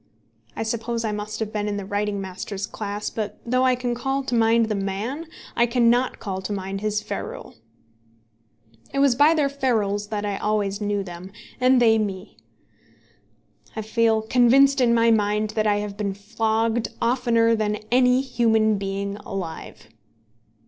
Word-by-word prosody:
I - - -2
suppose 230 +1 -2
I 215 - -1
must 210 0 -5
have 215 0 -3
been 210 -1 -2
in 205 -1 -2
the 200 - -5
writing 205 0 -2
master's 190 +1 -5
class, 205 0 -5
but 215 -2 -4
though 255 +2 +1
I 255 -1 +4
can 245 -1 -2
call 270 +3 -2
to 260 - -4
mind 230 0 +4
the 220 - -2
man, 210 +11 -3 0.3
I 235 0 +3
cannot 240 +1 +2
call 190 -2 -5
to 190 - -5
mind 195 0 -4
his 210 0 -1
ferule. - - -6 1.3
It - - -5
was 275 -2 +4
by 295 +6 +5
their 300 -3 +2
ferules 220 -7 -1
that 210 -2 -3
I 200 -1 -2
always 210 -1 -1
knew 205 -1 -1
them, 180 +1 -9 0.3
and 255 0 +4
they 225 -2 +4
me. 200 -1 -4 1.4
I 220 - -3
feel 220 0 +2
convinced 260 +4 +4
in 235 -1 +4
my 230 0 +4
mind 210 0 +1
that 215 -1 0
I 205 - +3
have 205 -1 -4
been 200 -2 -2
flogged 225 +2 0
oftener 230 -1 +2
than 210 -1 0 0.2
any 250 +1 +4
human 220 -5 +2
being 200 +1 -3
alive. 190 -5 -7
220 Hz, 165 wpm, -23 LUFS, 205-240 Hz, 1.4 s, by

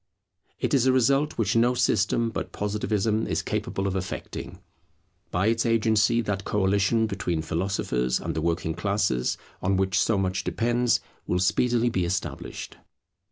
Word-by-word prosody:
It - - -1
is 130 -2 +4
a - - +6
result 135 +4 +2
which 105 -3 +1
no 120 +2 +3
system 115 -1 +1
but - - -4
Positivism 105 +1 -1
is - - -1
capable 95 - -2
of 100 -1 -1
effecting. 95 -1 -5 0.7
By 90 +2 0
its 115 +1 +2
agency 115 0 +3
that 100 -3 -2
coalition 100 +3 +2
between 90 -6 -2
philosophers 80 -8 -1
and - - -3
the 80 - -2
working 85 0 -1
classes, 100 -10 0 0.2
on 95 0 +1
which 95 0 +1
so 110 - +2
much 95 -1 -1
depends, 120 +1 +1 0.3
will 90 - +1
speedily 120 +6 +2
be 95 -6 0
established. 90 +2 -4
105 Hz, 150 wpm, -26 LUFS, 95-115 Hz, 0.7 s, a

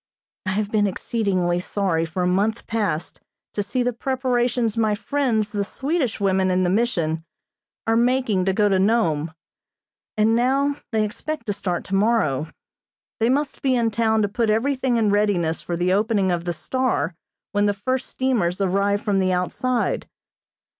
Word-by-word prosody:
I 185 - +1
have 210 +1 -1
been 210 -2 +3
exceedingly 185 -4 0
sorry 180 -3 -1
for 170 +3 -3
a - - +2
month 205 +5 0
past 205 -8 -2 0.3
to 205 - -1
see 245 +5 -1
the 245 0 0
preparations 245 -2 0
my 220 -2 +2
friends, 225 -3 0
the 205 -1 -1
Swedish 270 - -2
women 190 -1 +2
in 185 0 +2
the 175 - +1
Mission, 170 -8 0 0.6
are 225 - +2
making 235 -5 +2
to 190 - +2
go 210 +1 +3
to 195 -2 +2
Nome, 170 -7 +1 0.9
and 220 +1 +3
now 275 +4 +2
they 220 -2 +2
expect 310 +8 -5
to 205 - -1
start 180 -3 -3
tomorrow. 195 - +1 0.7
They 230 +1 +2
must 285 +2 0
be 260 -2 +2
in 230 -2 +1
town 220 0 +2
to - - +2
put 220 +2 0
everything 255 +2 +1
in 215 -3 +2
readiness 195 -6 +1
for 175 - -3
the 180 +1 +1
opening 205 -2 +2
of 175 -1 -2
the 175 - -1
"Star" 175 - -1 0.4
when 205 0 +2
the 205 - +2
first 255 +6 -2
steamers 220 -10 0
arrive 200 +2 +1
from 200 -2 +1
the 185 -1 +2
outside. 230 +7 -1
210 Hz, 165 wpm, -23 LUFS, 185-235 Hz, 0.9 s, been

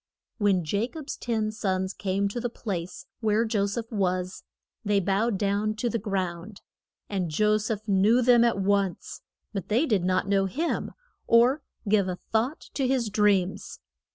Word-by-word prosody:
] - - -60
When 195 -5 +2
Ja 200 +9 0
cob's 305 +1 -7
ten 220 -3 -1
sons 190 -2 -2
came 200 0 -1
to 240 - -4
the 245 0 -2
place 185 -7 -5
where 220 0 +2
Jo 210 -3 +1
seph 225 +3 -4
was, 185 -3 -1 0.4
they 205 -2 +2
bowed 200 +3 +1
down 205 +2 0
to 235 +2 -1
the 230 - -1
ground. 190 -1 -4 0.5
And 185 -4 -2
Jo 210 +7 +2
seph 215 0 -4
knew 210 +5 +4
them 240 -1 +6
at 235 -3 +2
once, 195 -2 -1 0.3
but 195 -3 -4
they 235 +9 +2
did 210 - +1
not 185 +1 +1
know 195 -1 +2
him, 310 - -2 0.3
or 245 +5 +5 0.3
give 200 -2 +3
a 180 - -2 0.2
thought 235 +7 0
to 270 -2 0
his 250 -5 0
dreams. 195 -3 +1
205 Hz, 170 wpm, -26 LUFS, 195-230 Hz, 0.5 s, them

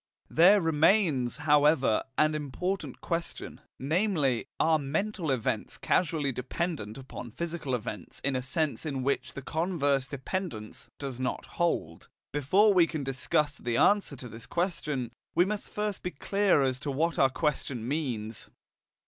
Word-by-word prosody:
There 190 +5 +6
remains, 160 - +3
however, 150 -5 +4
an 155 0 +4
important 150 0 -3
question, 170 +5 -4 0.2
namely: 150 - +1
Are 160 -1 +4
mental 165 +5 -2
events 130 -5 -1
causally 150 -5 +1
dependent 125 - -3
upon 130 -2 -8
physical 160 0 -3
events 110 -6 -6
in 140 -1 +1
a 130 - 0
sense 140 -1 -1
in 135 -5 -3
which 140 +1 -1
the 140 - -6
converse 145 -5 0
dependence 135 - -5
does 135 -3 -5
not 130 -1 -2
hold? 85 - -2 0.2
Before 190 +10 +4
we 175 -3 +5
can 155 -4 -4
discuss 135 +3 0
the 120 -1 -1
answer 205 -8 +3
to 125 -1 -8
this 115 +1 -9
question, 150 -8 -2 0.2
we 175 +2 +5
must 210 +1 -3
first 210 -1 -2
be 180 - -2
clear 195 -1 +2
as 130 -1 0
to 145 - -4
what 160 +4 0
our 135 - +6
question 130 -5 -2
means. 120 -7 -3
145 Hz, 145 wpm, -29 LUFS, 130-170 Hz, 0.2 s, There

